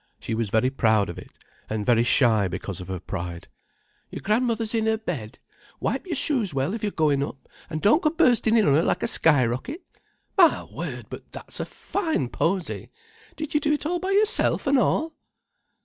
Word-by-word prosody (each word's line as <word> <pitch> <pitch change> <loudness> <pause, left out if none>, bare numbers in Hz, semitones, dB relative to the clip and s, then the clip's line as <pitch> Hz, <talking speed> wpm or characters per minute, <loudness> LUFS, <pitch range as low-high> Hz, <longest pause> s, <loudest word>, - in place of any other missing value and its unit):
She 115 - -4
was 110 -2 -1
very 115 +5 +2
proud 110 -6 +2
of 85 - -7
it, - - -14 0.3
and 110 -1 -2
very 120 -2 +4
shy 115 -4 +4
because 90 +1 -5
of 90 - -9
her 95 -1 -4
pride. 85 0 -6 0.6
"Your - - -7
gran'mother's 225 +1 0
in 220 -1 +1
her 220 0 +2
bed. 150 - -5 0.4
Wipe - - -2
your 340 - -2
shoes 245 - 0
well 135 +7 0
if 225 - -4
you're 210 - -1
goin' 150 -5 +1
up, 140 -1 -6 0.2
and 155 -1 -4
don't 215 +11 +5
go 305 - +3
burstin' 245 -8 +3
in 215 - +4
on 140 - +5
her 150 - +4
like - - 0
a - - +1
skyrocket. 145 - +1 0.5
My 350 -5 +5
word, - - -6
but - - -9
that's - - -9
a - - -2
fine 320 - -2
posy! 180 +5 -2 0.5
Did 310 -2 -5
you 300 - +3
do 300 0 +1
it 295 - -2
all 350 +3 0
by 375 +2 -3
yourself, 415 -5 +2
an' 275 -1 +4
all?" 320 +5 +1
180 Hz, 195 wpm, -25 LUFS, -, 0.6 s, don't